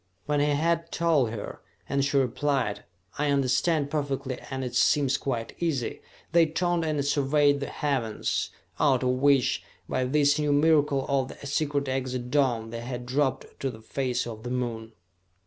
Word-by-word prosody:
When 145 Hz, 0 st, +1 dB
he 145 Hz, -, +3 dB
had 165 Hz, +3 st, +1 dB
told 160 Hz, -8 st, +2 dB
her, 110 Hz, -2 st, -7 dB, 0.3 s
and 140 Hz, 0 st, +1 dB
she 140 Hz, 0 st, +1 dB
replied, 130 Hz, -4 st, 0 dB, 0.3 s
"I 150 Hz, 0 st, +1 dB
understand 140 Hz, +2 st, +1 dB
perfectly, 140 Hz, -3 st, -2 dB
and 130 Hz, -1 st, -3 dB
it 125 Hz, -1 st, -4 dB
seems 135 Hz, +2 st, +3 dB
quite 125 Hz, -5 st, -3 dB
easy," 155 Hz, -8 st, -1 dB, 0.3 s
they 165 Hz, -1 st, +5 dB
turned 175 Hz, +1 st, 0 dB
and 150 Hz, -3 st, -1 dB
surveyed 145 Hz, 0 st, +3 dB
the 140 Hz, -, -3 dB
heavens, 130 Hz, -7 st, -1 dB, 0.3 s
out 130 Hz, -3 st, +3 dB
of 125 Hz, -, +2 dB
which, 135 Hz, 0 st, +3 dB, 0.3 s
by 130 Hz, -, 0 dB
this 145 Hz, +2 st, +3 dB
new 150 Hz, -1 st, +2 dB
miracle 145 Hz, -2 st, +3 dB
of 135 Hz, -2 st, +1 dB
the -, -, -10 dB
secret 145 Hz, 0 st, -1 dB
exit 130 Hz, -2 st, -3 dB
dome, 120 Hz, -6 st, +1 dB
they 115 Hz, 0 st, -5 dB
had 125 Hz, 0 st, -5 dB
dropped 135 Hz, +1 st, 0 dB
to 135 Hz, -, -1 dB
the 110 Hz, -3 st, -9 dB
face 130 Hz, +2 st, -1 dB
of 110 Hz, -2 st, -7 dB
the 120 Hz, -, -6 dB
Moon. 115 Hz, -3 st, -3 dB
140 Hz, 165 wpm, -27 LUFS, 125-145 Hz, 0.3 s, they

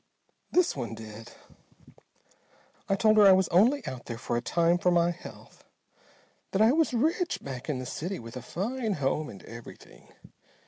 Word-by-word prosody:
"This 360 Hz, -1 st, +3 dB
one 120 Hz, -4 st, -4 dB
did. 110 Hz, +1 st, -10 dB, 1.6 s
I 195 Hz, -, +3 dB
told 215 Hz, +2 st, +3 dB
her 205 Hz, -1 st, +8 dB
I 190 Hz, -, +9 dB
was 190 Hz, -1 st, +3 dB
only 240 Hz, +11 st, +3 dB
out 130 Hz, -2 st, -6 dB
there 115 Hz, -, -6 dB
for 120 Hz, 0 st, -3 dB
a 120 Hz, -, 0 dB
time 170 Hz, +6 st, +2 dB
for 180 Hz, -, +2 dB
my 175 Hz, 0 st, +3 dB
health. 175 Hz, -, -12 dB, 0.9 s
That 195 Hz, -, +2 dB
I 225 Hz, -, +6 dB
was 320 Hz, +2 st, +2 dB
rich 320 Hz, +9 st, 0 dB
back 135 Hz, 0 st, -7 dB
in 145 Hz, -, -1 dB
the 130 Hz, -, -5 dB
city, 175 Hz, +9 st, -4 dB
with 115 Hz, +1 st, -10 dB
a 125 Hz, -, -5 dB
fine 220 Hz, -, -3 dB
home 150 Hz, 0 st, -1 dB
and 100 Hz, -, -11 dB
everything. 115 Hz, 0 st, -13 dB
170 Hz, 175 wpm, -28 LUFS, -, 1.6 s, I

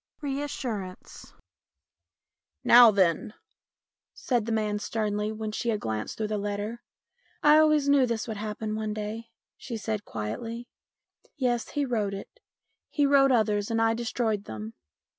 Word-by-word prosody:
Ill 285 Hz, -, -1 dB
REASSURANCE 235 Hz, -9 st, -5 dB, 0.6 s
" 85 Hz, -3 st, -63 dB
Now 240 Hz, -1 st, +11 dB
then," 195 Hz, 0 st, +1 dB, 0.8 s
said 240 Hz, -4 st, -1 dB
the -, -, -1 dB
man 210 Hz, -2 st, 0 dB
sternly 210 Hz, 0 st, -2 dB
when 220 Hz, 0 st, -4 dB
she 235 Hz, +2 st, -2 dB
had 215 Hz, -2 st, 0 dB
glanced 110 Hz, -, -4 dB
through 215 Hz, -1 st, -2 dB
the 210 Hz, -1 st, -1 dB
letter. 205 Hz, +3 st, -4 dB, 0.3 s
" 485 Hz, -, -38 dB
I 300 Hz, +1 st, +7 dB
always 305 Hz, -2 st, +4 dB
knew 280 Hz, -2 st, +5 dB
this 230 Hz, -1 st, -2 dB
would 220 Hz, -2 st, -4 dB
happen 215 Hz, +1 st, -4 dB
one 215 Hz, -1 st, -3 dB
day," 215 Hz, +2 st, -5 dB, 0.3 s
she 235 Hz, -3 st, -6 dB
said 215 Hz, -1 st, -3 dB
quietly. 215 Hz, -, -5 dB, 0.7 s
"Yes, 245 Hz, -3 st, 0 dB
he 290 Hz, -1 st, -1 dB
wrote 215 Hz, -6 st, -1 dB
it. 200 Hz, -, -10 dB, 0.5 s
He 290 Hz, -, +2 dB
wrote 275 Hz, -1 st, +5 dB
others 210 Hz, -3 st, +2 dB
and 225 Hz, 0 st, 0 dB
I 225 Hz, 0 st, +3 dB
destroyed 225 Hz, -3 st, -1 dB
them. 110 Hz, 0 st, -7 dB
220 Hz, 155 wpm, -27 LUFS, 205-240 Hz, 0.8 s, Now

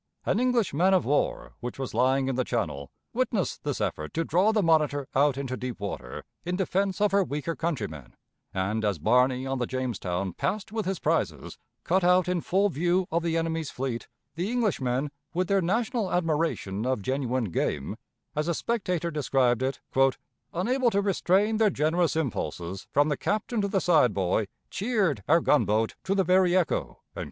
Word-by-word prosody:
An -, -, +1 dB
English 245 Hz, -, +1 dB
man 185 Hz, +6 st, +4 dB
of 185 Hz, -, +2 dB
war, 145 Hz, +2 st, 0 dB
which 120 Hz, -1 st, -6 dB
was 135 Hz, -2 st, -4 dB
lying 130 Hz, +3 st, +2 dB
in 135 Hz, -, 0 dB
the 130 Hz, +1 st, 0 dB
channel, 70 Hz, -, -3 dB, 0.2 s
witnessed -, -, -1 dB
this -, -, -2 dB
effort 75 Hz, 0 st, -3 dB
to 165 Hz, -, +1 dB
draw 185 Hz, +6 st, +3 dB
the 215 Hz, -2 st, +2 dB
Monitor 150 Hz, -4 st, +2 dB
out 140 Hz, 0 st, +3 dB
into 135 Hz, -2 st, -3 dB
deep 125 Hz, -3 st, -5 dB
water 95 Hz, -11 st, -5 dB, 0.2 s
in 180 Hz, +1 st, -2 dB
defense 190 Hz, +1 st, 0 dB
of 210 Hz, -1 st, +3 dB
her 200 Hz, 0 st, +4 dB
weaker 150 Hz, +1 st, -3 dB
countrymen, 105 Hz, -, -4 dB, 0.4 s
and, 100 Hz, +4 st, -1 dB
as 100 Hz, -4 st, +1 dB
Barney 125 Hz, -, +2 dB
on 135 Hz, -1 st, -2 dB
the 120 Hz, -, -1 dB
Jamestown 95 Hz, -8 st, -2 dB
passed 195 Hz, +9 st, -2 dB
with 220 Hz, -3 st, -2 dB
his 190 Hz, -1 st, -1 dB
prizes, -, -, -1 dB, 0.2 s
cut 185 Hz, +2 st, +2 dB
out 180 Hz, 0 st, +4 dB
in 180 Hz, -1 st, 0 dB
full 195 Hz, +5 st, +2 dB
view 175 Hz, +3 st, +1 dB
of 170 Hz, +1 st, +1 dB
the 165 Hz, -1 st, 0 dB
enemy's 165 Hz, -2 st, -1 dB
fleet, 125 Hz, -2 st, -4 dB, 0.3 s
the 175 Hz, +6 st, -2 dB
Englishmen, 145 Hz, -, 0 dB, 0.2 s
with 180 Hz, +1 st, +1 dB
their 195 Hz, -1 st, +3 dB
national 220 Hz, +2 st, 0 dB
admiration 155 Hz, -, 0 dB
of 130 Hz, -5 st, -1 dB
genuine 130 Hz, -4 st, -1 dB
"game," 75 Hz, +4 st, -1 dB, 0.4 s
as 150 Hz, +1 st, -1 dB
a 170 Hz, -, +1 dB
spectator 180 Hz, -7 st, -1 dB
described 130 Hz, -5 st, +1 dB
it, 130 Hz, -1 st, -2 dB, 0.7 s
"unable 245 Hz, +8 st, +1 dB
to 200 Hz, -, +1 dB
restrain 200 Hz, +2 st, +2 dB
their 220 Hz, -1 st, +4 dB
generous 165 Hz, 0 st, +1 dB
impulses, 95 Hz, -, -3 dB
from 145 Hz, +2 st, +3 dB
the 145 Hz, -, 0 dB
captain 215 Hz, +2 st, -1 dB
to 200 Hz, -, 0 dB
the 195 Hz, -1 st, +1 dB
side 155 Hz, -, +3 dB
boy, 95 Hz, +2 st, +1 dB, 0.2 s
cheered 195 Hz, -, 0 dB
our 165 Hz, +3 st, +5 dB
gunboat 110 Hz, -8 st, +2 dB
to 195 Hz, -, 0 dB
the 195 Hz, -, +3 dB
very 185 Hz, -1 st, +4 dB
echo." 180 Hz, -, -1 dB
155 Hz, 180 wpm, -27 LUFS, 125-185 Hz, 0.7 s, our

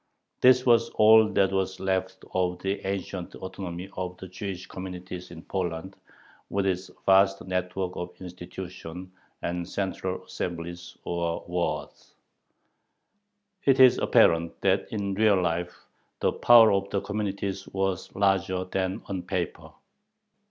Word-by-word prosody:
This 125 Hz, 0 st, +6 dB
was 115 Hz, -1 st, +4 dB
all 110 Hz, 0 st, +7 dB
that 95 Hz, -1 st, +3 dB
was 95 Hz, -1 st, -1 dB
left 95 Hz, 0 st, -2 dB
of 90 Hz, -1 st, 0 dB
the 95 Hz, +1 st, -2 dB
ancient 95 Hz, -2 st, -4 dB
autonomy 95 Hz, -1 st, -6 dB
of 90 Hz, -1 st, -4 dB
the 95 Hz, -, -9 dB
Jewish 90 Hz, 0 st, -6 dB
communities 90 Hz, -1 st, -7 dB
in 85 Hz, -1 st, -10 dB
Poland, 95 Hz, 0 st, -3 dB, 0.5 s
with 100 Hz, -1 st, 0 dB
its 95 Hz, -1 st, -1 dB, 0.2 s
vast 95 Hz, 0 st, +4 dB
network 90 Hz, 0 st, -2 dB
of 90 Hz, 0 st, -6 dB
institutions 90 Hz, 0 st, -8 dB, 0.3 s
and 85 Hz, 0 st, -3 dB
central 95 Hz, -1 st, -3 dB
assemblies, 85 Hz, 0 st, -6 dB
or 85 Hz, -1 st, -2 dB
Waads. 90 Hz, 0 st, -3 dB, 1.5 s
It 135 Hz, -1 st, +4 dB
is 130 Hz, -1 st, +7 dB
apparent 85 Hz, 0 st, +3 dB
that 95 Hz, 0 st, +1 dB
in 100 Hz, -2 st, -2 dB
real 105 Hz, -1 st, +4 dB
life 90 Hz, 0 st, -2 dB, 0.3 s
the -, -, +2 dB
power 115 Hz, -2 st, +7 dB
of 100 Hz, 0 st, 0 dB
the 100 Hz, -, -1 dB
communities 100 Hz, -1 st, -3 dB
was 95 Hz, -1 st, -2 dB
larger 95 Hz, -2 st, +1 dB
than 95 Hz, +2 st, -2 dB
on 95 Hz, -2 st, -4 dB
paper. 90 Hz, -3 st, -4 dB
95 Hz, 130 wpm, -27 LUFS, 90-100 Hz, 1.5 s, all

